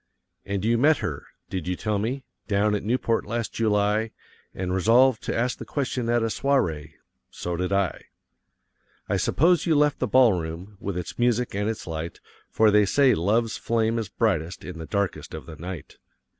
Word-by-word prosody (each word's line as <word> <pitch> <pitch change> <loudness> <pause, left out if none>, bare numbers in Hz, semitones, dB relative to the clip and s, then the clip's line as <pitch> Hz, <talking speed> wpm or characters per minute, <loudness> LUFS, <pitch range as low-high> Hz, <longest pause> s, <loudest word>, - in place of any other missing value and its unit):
And 100 0 -2
you 115 +1 +2
met 150 +4 +5
her 70 - -5 0.2
did 90 -3 -3
you 90 - 0
tell 105 +2 -1
me 125 +6 -2 0.2
down 105 0 +2
at 105 - 0
Newport, 115 +1 0
last 115 +2 -3
July, 105 0 +1 0.4
and 90 -1 -3
resolved 115 +6 +4
to - - -2
ask 120 +2 0
the - - -5
question 130 -4 -2
at 120 -1 +2
a - - +2
soirée? 110 - 0 0.4
So 90 0 -4
did 90 +2 -2
I. 100 -2 0 1.0
I - - 0
suppose 170 +2 +2
you 160 - +3
left 150 0 +3
the - - 0
ball 130 -4 +5
room, 85 +4 -5
with 100 -2 -4
its 90 - -6
music 120 0 +1
and 105 +2 -1
its 110 - -4
light; 80 0 -5 0.3
for 110 -1 +4
they 105 0 +5
say 135 +4 +4
love's 110 +7 +1
flame 115 0 0
is 110 -4 -4
brightest 90 -7 -1
in 90 -2 -7
the 80 - -7
darkness 100 -2 -2
of - - -7
the 80 - -9
night. 85 +2 -8
105 Hz, 185 wpm, -25 LUFS, 90-120 Hz, 1.0 s, met